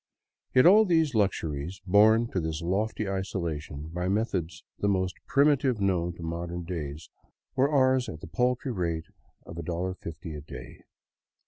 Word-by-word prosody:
Yet 130 - +7
all 205 +5 +8
these 160 -7 +2
luxuries, 90 -5 -1
borne 110 +4 +5
to 95 - 0
this 80 0 -3
lofty 105 +4 -1
isolation 85 -6 -4
by 90 +1 -2
methods 95 -5 -1 0.2
the 100 - +1
most 95 -2 +1
primitive 140 -4 +3
known 90 -3 +1
to 85 - -9
modern 85 +1 -4
days, 80 -3 -6 0.4
were 135 +2 +3
ours 130 -3 +3
at 80 - -7
the - - -9
paltry 125 +9 0
rate 85 -6 -2 0.4
of 80 - -9
$1.50 85 -1 -5
a 75 - -6
day. 65 -3 -11
90 Hz, 145 wpm, -28 LUFS, 80-115 Hz, 0.4 s, all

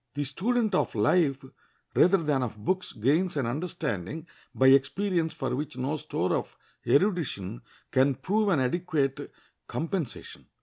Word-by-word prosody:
The 145 - -1
student 215 - 0
of 185 - +1
life 135 +5 +2 0.5
rather 190 +3 +5
than 150 -6 0
of 115 -4 -3
books 185 - -1
gains 150 - +1
an 135 - 0
understanding 150 - -3 0.3
by 130 0 +5
experience 160 +6 +2
for 130 -2 -3
which 145 0 -5
no 135 +4 -1
store - - -2
of - - -4 0.3
erudition 145 - +1 0.3
can 135 +1 +3
prove 210 - 0
an 160 -8 +3
adequate 140 -1 -1 0.4
compensation. 165 -4 -4
145 Hz, 135 wpm, -28 LUFS, 130-180 Hz, 0.5 s, rather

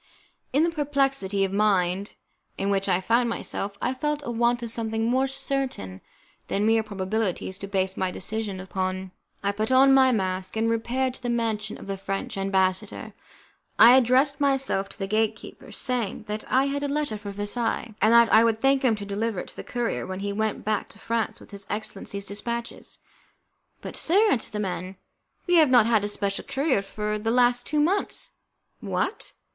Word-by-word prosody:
In 285 +4 +3
the 335 - +2
perplexity 275 - 0
of 190 - -4
mind 195 -2 +1 0.4
in 195 +1 0
which 195 0 0
I 180 -1 +3
found 235 +5 +2
myself, 200 -3 -4
I 255 - 0
felt 295 +3 -2
a 240 - -3
want 240 +1 +1
of 230 - -5
something 225 -1 -2
more 260 +3 +2
certain 270 - -3 0.5
than 205 +2 0
mere 225 0 +4
probabilities 200 -2 -3
to 200 - -6
base 190 -1 -1
my 185 - 0
decision 200 +1 -4
upon. 185 0 -3 0.3
I 200 - +2
put 215 +4 -2
on 270 +1 +6
my 265 -1 +6
mask, 185 -3 -2
and 225 +1 +1
repaired 250 +3 0
to - - -12
the 245 - -3
mansion 220 -3 -1
of - - -11
the 195 0 -4
French 195 +2 -4
ambassador. 190 -1 -1 0.6
I 235 +3 +9
addressed 265 +3 +3
myself 270 -8 +1
to - - -12
the 195 - -3
gate 215 +2 +1
keeper, - - -12
saying 240 -5 -2
that 215 0 -6
I 260 +1 +4
had 280 +1 -2
a 285 - -1
letter 290 -4 -1
for 205 -1 -7
Versailles, 215 +3 -2
and 215 +3 +5
that 235 0 +6
I 220 - +8
would 225 -1 +2
thank 270 +2 +3
him 245 -4 +3
to 205 -1 -7
deliver 205 0 -2
it - - -10
to - - -13
the - - -7
courier 240 -1 -2
when 185 +1 -5
he 200 0 -2
went 220 +1 -2
back 215 -1 -1
to - - -12
France 230 -1 -2
with - - -16
his 200 0 -10
excellency's 200 -1 -5
dispatches. 235 +4 -5 0.8
"But, - - -7
sir," 405 +6 +3
answered 230 - -1
the 210 - -2
man, 185 -1 -4 0.5
"we 355 -1 +4
have 310 -4 +6
not 245 -4 +6
had 225 -3 +3
a - - 0
special 200 -1 -2
courier 270 -6 0
for 210 +2 -3
the 225 +2 -2
last 245 +1 +3
two 300 - 0
months." 365 +7 0 0.5
"What? - - -3
220 Hz, 195 wpm, -25 LUFS, 200-255 Hz, 0.8 s, I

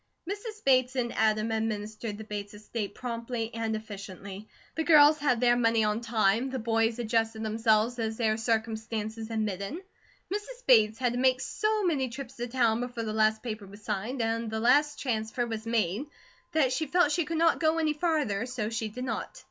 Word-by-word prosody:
Mrs. 420 +2 -6
Bates 255 -1 +4
and 240 -2 -1
Adam 215 0 +1
administered 215 -1 -3
the 220 - -7
Bates 205 -1 -6
estate 210 0 -5
promptly 235 -1 -4
and 225 -1 -2
efficiently. 200 -1 -8 0.3
The 320 - -1
girls 305 -1 +7
had 255 -5 +2
their 240 0 +4
money 230 -2 +3
on 210 +1 0
time, 225 +1 +1
the 260 - -3
boys 225 0 +1
adjusted 225 -1 0
themselves 220 +2 +2
as 220 -1 -2
their 220 -2 +2
circumstances 220 0 -2
admitted. 210 - -2 0.6
Mrs. 480 +5 -6
Bates 220 -3 +5
had 245 -1 0
to 245 - -2
make 255 0 +3
so 430 +8 0
many 285 -8 +1
trips 265 +1 -8
to 240 0 -3
town, 235 -2 +2
before 245 -1 -4
the 215 -1 -3
last 220 0 +2
paper 215 -4 -5
was 200 +2 -14
signed, 220 +5 -2
and 225 0 -1
the 220 0 -2
last 290 +6 +3
transfer 225 -1 -1
was 225 -1 -5
made, 225 - 0 0.5
that 270 -5 +3
she 315 +4 -1
felt 350 0 +3
she 345 +1 +1
could 325 +2 -3
not 330 +1 +3
go 315 0 +2
any 310 -2 +1
farther, 295 - 0
so 240 -4 -3
she 225 -1 -2
did 250 +4 -6
not. 245 -3 -4
230 Hz, 190 wpm, -29 LUFS, 220-255 Hz, 0.6 s, girls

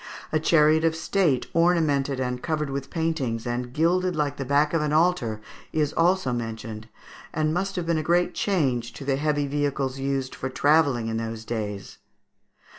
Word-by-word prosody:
A 155 - +2
chariot 155 0 +4
of 165 -1 +2
state, 160 -5 +1
ornamented 155 -6 +2
and 125 -1 -2
covered 150 -3 -2
with 135 0 -4
paintings, 150 -9 -2
and 120 0 -3
gilded 175 +5 +1
like 145 -2 -1
the 135 - -4
back 145 +3 +2
of 165 - +2
an 150 -1 0
altar, 155 -10 +1 0.3
is 150 -1 0
also 170 -6 +2
mentioned, 115 -1 -5 0.4
and 155 0 0
must 195 +3 -2
have 180 -2 -2
been 165 -1 +1
a - - 0
great 175 +2 +2
change 130 - 0
to 135 - -9
the 135 -1 +1
heavy 145 0 0
vehicles 140 -2 -1
used 135 -1 -2
for 130 - -4
travelling 140 -3 +3
in 110 0 -2
those 115 0 -5
days. 105 -4 -5
145 Hz, 175 wpm, -25 LUFS, 125-160 Hz, 0.4 s, chariot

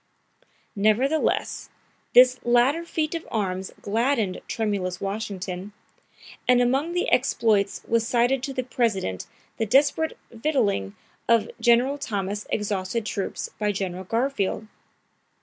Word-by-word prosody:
Nevertheless, 230 +9 +1 0.5
this 255 0 +7
latter 245 +7 +3
feat 315 -2 -2
of 335 -1 -5
arms 190 -3 -2
gladdened 225 -2 0
tremulous 195 -5 -2
Washington, 195 -1 -4 0.7
and 250 -1 +5
among 270 +7 +1
the 355 - 0
exploits 220 -6 +2
was 230 0 +1
cited 245 +2 +2
to 270 +1 -4
the 260 -1 -2
President 220 - -1 0.3
the 225 - -1
desperate 285 +6 +2
victualing 225 - 0 0.3
of 230 -2 +3
General 250 +4 +3
Thomas' 205 -3 -3
exhausted 205 +1 -2
troops 200 -2 -3
by 210 -1 +1
General 185 -2 -4
Garfield. 230 -1 -1
225 Hz, 115 wpm, -25 LUFS, 200-255 Hz, 0.7 s, this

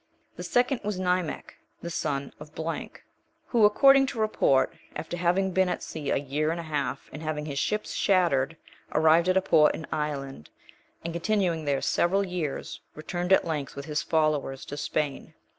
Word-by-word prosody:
The - - -8
second 250 +1 +1
was 210 -2 -2
Nimech, 180 -3 -1 0.3
the 170 - -4
son 140 -4 -2
of...,(2) 160 +2 -6 0.5
who, 230 -4 +5
according 270 +5 +6
to 245 - -5
report, 215 -11 +2 0.2
after 165 - -5
having 180 +2 +1
been 190 0 +2
at - - -3
sea 150 -3 -5
a - - +2
year 145 +3 -1
and 165 +1 -2
a - - -5
half, 140 -4 -3
and 150 - -7
having 155 -1 -3
his 140 -2 -3
ships 210 +6 -1
shattered, 165 -6 +2 0.4
arrived 160 +3 +4
at 185 - +3
a 190 - +2
port 155 -5 +4
in 155 - -7
Ireland, 140 - -4 0.6
and 170 - -3
continuing 170 -3 0
there 140 -2 0
several 195 +3 +2
years, 175 -6 -4
returned 175 +4 -4
at 190 - +5
length 150 -4 -3
with 140 - -6
his 150 -2 -1
followers 155 -4 0
to 145 - -6
Spain. 145 -1 -3
160 Hz, 175 wpm, -27 LUFS, 150-185 Hz, 0.6 s, according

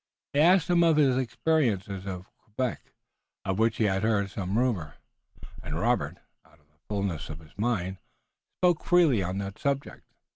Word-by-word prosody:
He 140 - +2
asked 175 +2 +5
him 175 -1 +3
of 165 -2 +4
his 135 -4 +4
experiences 110 - 0
at 90 -2 -5 0.2
Quebec, 120 +3 -4 0.5
of 95 +1 -1
which 115 0 +2
he - - +1
had 95 -2 +1
heard 105 -3 +1
some 100 0 -2
rumor, 105 - 0 0.7
and - - -5
Robert, - - 0 0.3
out 75 - -25
of 75 - -32
the 75 - -38
fullness 100 -7 -2
of 80 - -6
his 80 -2 -17
mind, 100 -4 -1 0.6
spoke 175 -3 +2
freely 165 - +4
on 90 +1 -2
that 100 0 -5
subject. 140 0 -2
105 Hz, 170 wpm, -28 LUFS, 95-140 Hz, 0.7 s, asked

